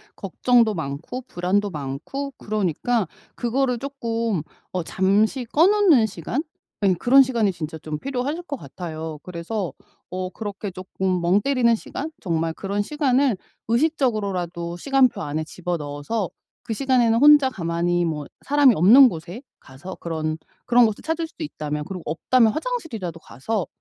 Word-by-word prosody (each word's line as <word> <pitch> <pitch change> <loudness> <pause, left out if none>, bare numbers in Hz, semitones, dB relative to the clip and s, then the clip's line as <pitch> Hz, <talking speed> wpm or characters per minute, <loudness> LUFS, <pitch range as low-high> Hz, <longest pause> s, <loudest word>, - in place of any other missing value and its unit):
걱정도 235 -4 +2
많고 160 - -5
불안도 195 +3 0
많고 150 - -5
그러니까 210 +1 -1 0.3
그거를 250 0 0
쪼끔 230 - -2 0.3
어 180 -2 -2
잠시 210 - +1
꺼 315 +9 +4
놓는 385 - +5
시간 220 - -3 0.4
예 190 -2 +5
그런 250 +10 +6
시간이 230 -6 +1
진짜 160 -2 -6
좀 155 0 -5
필요하실 275 - -3
것 285 -5 -5
같아요. 160 - -7
그래서 180 -1 -4 0.4
어 185 0 -3
그렇게 205 -1 -6
쪼끔 185 0 -2
멍 185 +4 +3
때리는 250 -3 +3
시간 300 +7 -6
정말 165 -2 -1
그런 200 +4 -2
시간을 270 - +1 0.3
의식적으로라도 200 - 0
시간표 270 +1 +2
안에 150 +2 -2
집어넣어서 170 +4 -3 0.3
그 225 - -3
시간에는 240 -2 +2
혼자 290 -2 +7
가만히 175 -3 0
뭐 150 -3 -3 0.2
사람이 285 -3 +5
없는 235 - +8
곳에 175 +6 -7 0.2
가서 140 +8 -10
그런 160 -1 -3 0.3
그런 245 0 +5
곳을 215 -2 -2
찾을 325 +1 -2
수도 315 - -9
있다면 150 - -4
그리고 185 -3 -6
없다면 220 +8 +3
화장실이라도 285 - -4
가서 190 - -3
205 Hz, 330 characters per minute, -23 LUFS, 170-255 Hz, 0.4 s, 없는